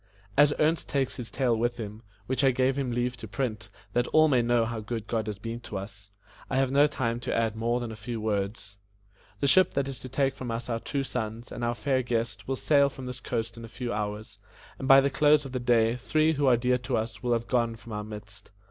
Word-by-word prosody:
As 145 0 +6
Ernest 155 +2 +1
takes 135 -4 0
this 120 -3 -5
Tale 125 -4 +1
with 120 +2 0
him 110 -1 -6 0.2
which 130 +2 0
I 135 - +6
gave 130 +1 +2
him 135 -2 -1
leave 120 +1 -1
to 110 - -8
print, 110 0 -3 0.2
that 120 0 +1
all 155 0 +5
may 130 -5 +3
know 120 -1 +2
how 115 0 -3
good 110 0 -4
God 110 -2 -2
has 105 -2 -3
been 115 +3 -5
to 105 -4 -6
us 100 0 -9 0.4
I - - -1
have 135 -1 +2
no 145 +2 +5
time 120 -5 -2
to 120 - -2
add 115 -2 +1
more 115 +2 0
than 120 -2 -4
a - - -7
few 110 +2 -5
words. 100 -1 -3 0.6
The 140 - +2
ship 185 +5 +5
that 140 -1 +1
is 135 -2 -6
to 130 - -9
take 135 +1 +1
from 130 -2 -6
us 115 +1 -4
our 115 - -1
two 140 +3 -2
sons 115 -2 -4
and 120 - -5
our 120 0 0
fair 130 +1 +1
guest 115 -4 -2
will 135 - 0
sail 140 +1 +3
from 130 -1 -9
this 125 0 -6
coast 115 -2 -3
in 115 - -8
a - - -7
few 120 +1 -4
hours, 105 -1 -4 0.4
and 135 - -3
by 135 0 +9
the 140 0 +1
close 150 0 +4
of 135 - -7
the 130 - -2
day 115 -1 +3
three 155 +5 +2
who 145 -2 +1
are 125 -2 +6
dear 125 +1 +1
to 120 - -1
us 110 +1 -4
will 120 0 +1
have 115 0 0
gone 120 -2 +1
from 115 +1 -12
our 105 0 -3
midst. 105 -1 -10
120 Hz, 255 wpm, -28 LUFS, 110-135 Hz, 0.6 s, by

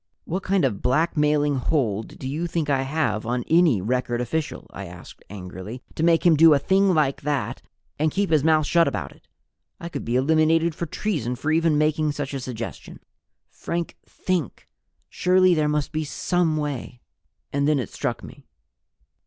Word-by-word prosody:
"What 185 +4 -3
kind 190 -4 +1
of 105 -7 -2
blackmailing 150 +1 +2
hold 115 -6 -1
do 130 - -6
you 155 +6 -2
think 160 -3 -1
I 135 -1 +2
have 135 -6 -1
on 120 +1 -2
any 160 - +4
record 120 +2 -1
official," 150 +6 -3
I - - -7
asked - - -12
angrily, 95 +4 -8
"to - - -5
make 165 0 +3
him 170 -2 +6
do 160 0 +7
a - - +4
thing 190 +5 +2
like 145 -3 +1
that 145 -1 -2 0.4
and 155 +1 +2
keep 195 0 -1
his 155 -3 +3
mouth 155 -1 +3
shut 170 +2 +3
about - - -3
it? - - -21 0.5
I 170 - -6
could 145 -4 -5
be 120 - -2
eliminated 160 +4 +3
for 170 +2 -4
treason 150 - -2
for 155 +5 -2
even 160 -1 +3
making 155 0 +1
such 145 -1 -4
a 135 - -2
suggestion." 120 -3 -7 0.5
"Frank, 170 0 -4
think! 180 -8 -3 0.4
Surely 185 0 +3
there 155 -2 +1
must 150 -1 -1
be 155 0 -2
some 165 +1 0
way!" 140 -4 -4 0.5
And 140 0 +1
then 150 -1 +3
it 125 -7 -4
struck - - -3
me. - - -13
150 Hz, 180 wpm, -24 LUFS, 130-165 Hz, 0.5 s, do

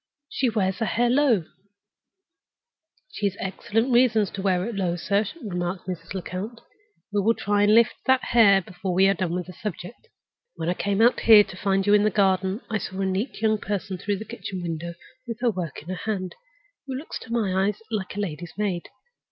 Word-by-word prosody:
She 260 - 0
wears 195 -4 0
her 225 - +1
hair 240 0 +2
low—" 250 - +3 1.7
"She 205 - -1
has 200 0 -4
excellent 220 +5 -1
reasons 230 -5 +4
to 195 - -5
wear 185 -2 +1
it 235 - -4
low, 185 -4 -1
sir," 200 +4 0 0.2
remarked 180 -2 -3
Mrs. 180 +1 -6
Lecount. 190 +6 -5 0.5
"We 205 - +2
will 225 +3 +3
try 205 0 0
and 205 +1 +5
lift 230 -1 +5
that 260 0 +4
hair 200 -5 +5
before 180 0 -4
we 190 +1 +5
have 195 -1 +3
done 175 -2 -1
with 180 -1 -3
the 180 - -10
subject. 210 - -7 0.5
When 165 - -3
I - - +2
came 200 +3 0
out 240 - +4
here 220 -2 +8
to 190 - -11
find 195 0 0
you 205 - +4
in 210 - +6
the 215 - +4
garden, 190 +1 +1
I 220 -1 -1
saw 190 -1 -6
a - - +1
neat 195 +6 -2
young 215 -1 +3
person 195 -2 -3
through 200 +1 -1
the 215 - -7
kitchen 185 -4 -6
window, 170 0 -4 0.3
with 230 -2 -4
her 245 -2 +3
work 175 -7 -5
in 165 - -12
her 185 +4 -3
hand, 185 -3 -3 0.5
who 265 - -4
looked 280 +5 -6
to - - -11
my 195 -4 +1
eyes 205 0 -1
like 200 -4 -3
a 205 - -2
lady's 175 -3 -5
maid. 195 -5 -1
200 Hz, 210 wpm, -25 LUFS, 185-220 Hz, 1.7 s, here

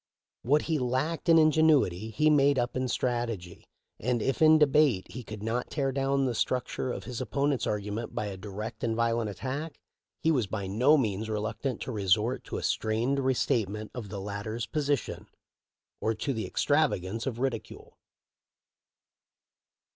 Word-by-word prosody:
What 145 +5 +2
he 160 -2 0
lacked 135 +8 -1
in 165 - +7
ingenuity 155 - +4
he 150 +7 +3
made 140 -1 +4
up 120 0 -1
in 130 0 0
strategy, 115 -8 -3 0.3
and 120 0 0
if 135 +6 -1
in 155 0 +7
debate 140 -10 +3
he 125 +6 -7
could 110 -1 -8
not 115 +3 -2
tear 140 -2 -1
down 135 0 +1
the 130 - +1
struct 125 +2 -1
ure 130 - -1
of - - -5
this 125 -3 -5
opponent's 140 -2 0
argument 105 +2 -3
by 105 - -1
a 100 -2 -5
direct 105 +3 -7
and 115 -1 0
violent 115 -1 +1
attack, 140 - -5 0.4
he 160 - +2
was 125 -9 +1
by 100 0 -4
no 125 +11 +4
means 110 -4 -1
reluctant 110 +4 -3
to - - -4
resort 105 +3 +1
to - - -5
a - - -5
strained 115 +6 0
restatement 110 -5 0
of 115 -5 -6
the 100 - -5
latter's 105 +3 -4
po 135 +7 -3
sition 145 -4 -1 0.7
or 110 0 0
to 135 +5 -2
the 110 -2 -3
extravagance 100 +8 0
of 120 -4 -2
ridicule. 125 -3 -4
120 Hz, 165 wpm, -29 LUFS, 110-140 Hz, 0.7 s, in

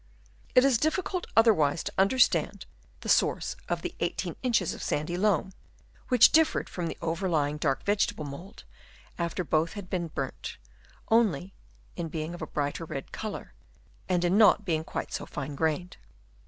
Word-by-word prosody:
It 255 - +7
is 260 -5 +4
difficult 355 - -1
otherwise 170 -10 +4
to - - -5
understand 245 +6 +2 0.4
the - - -7
source - - +2
of - - -1
the - - -4
18 - - -2
inches 230 -9 +1
of - - -9
sandy 155 +4 -2
loam, 190 -1 +1 0.5
which 250 -3 +7
differed 320 0 +3
from 175 -2 -3
the - - -5
overlying 165 -4 0
dark 140 -3 0
vegetable 200 -6 0
mould, 145 +8 -9 0.6
after 170 +1 -1
both 160 +1 +1
had 200 -3 -8
been 175 -2 -1
burnt, 140 -4 -5 0.5
only 195 -6 +2 0.4
in 170 -2 -3
being 155 +1 -4
of 175 - -9
a 155 - -4
brighter 145 +3 -3
red 135 -3 -6
colour, 215 -2 -6 0.6
and 180 -1 +2
in 175 - +2
uot 210 -1 +6
being 160 -3 0
quite - - -5
so - - -4
fine 145 0 -5
grained. 160 +4 -1
175 Hz, 160 wpm, -28 LUFS, 155-210 Hz, 0.6 s, It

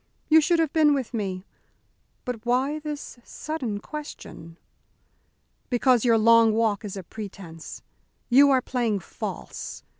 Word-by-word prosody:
You 320 0 +7
should 340 +3 +2
have 325 -3 0
been 300 -2 +4
with 260 -4 -4
me. 195 -4 -3 0.8
But 245 -3 -5
why 260 +5 0
this 295 -4 -7
sudden 255 -11 -5
question?" 205 - -9 1.1
"Because 245 -2 +3
your 230 -2 +4
long 230 0 +5
walk 220 -2 +1
is 200 -2 -6
a 190 - -6
pretence. 180 -4 -9 0.4
You 275 +3 +6
are 260 -2 +3
playing 230 -6 -1
false. - - -7
240 Hz, 130 wpm, -25 LUFS, 210-285 Hz, 1.1 s, You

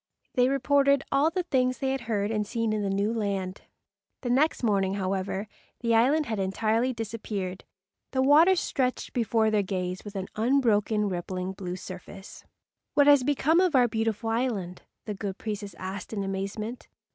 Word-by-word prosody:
They 250 -1 +3
reported 280 0 +3
all 280 +3 +4
the 360 +2 -2
things 255 -6 +1
they 265 -1 -1
had 270 -1 -2
heard 205 -1 0
and 210 -2 -1
seen 230 -1 -1
in 215 - -1
the 200 - -1
new 200 +3 0
land. 195 -4 -2 0.6
The 245 - -1
next 280 +2 +2
morning, 195 -3 +2
however, 195 +1 -2 0.3
the 230 -1 +1
island 275 +7 +4
had 220 -5 -3
entirely 220 +6 +1
disappeared. 210 -5 -5 0.4
The 260 0 +1
water 315 +7 +6
stretched 260 -7 -1
before 225 -2 +2
their 210 -1 +3
gaze 185 -2 -3
with 205 -1 -9
an 190 -1 -3
unbroken 220 -3 +2
rippling 185 0 -3
blue 180 -1 -5
surface. 190 +1 -10 0.5
"What 285 - +6
has 285 -2 +6
become 290 +4 +3
of 365 -5 +3
our 250 -2 +5
beautiful 225 0 -1
island," 220 -7 -2 0.2
the 210 - -3
good 195 -1 -5
priests 205 -4 -5
asked 190 +2 -6
in 200 -2 -2
amazement. 200 +5 -4
220 Hz, 170 wpm, -27 LUFS, 195-255 Hz, 0.6 s, water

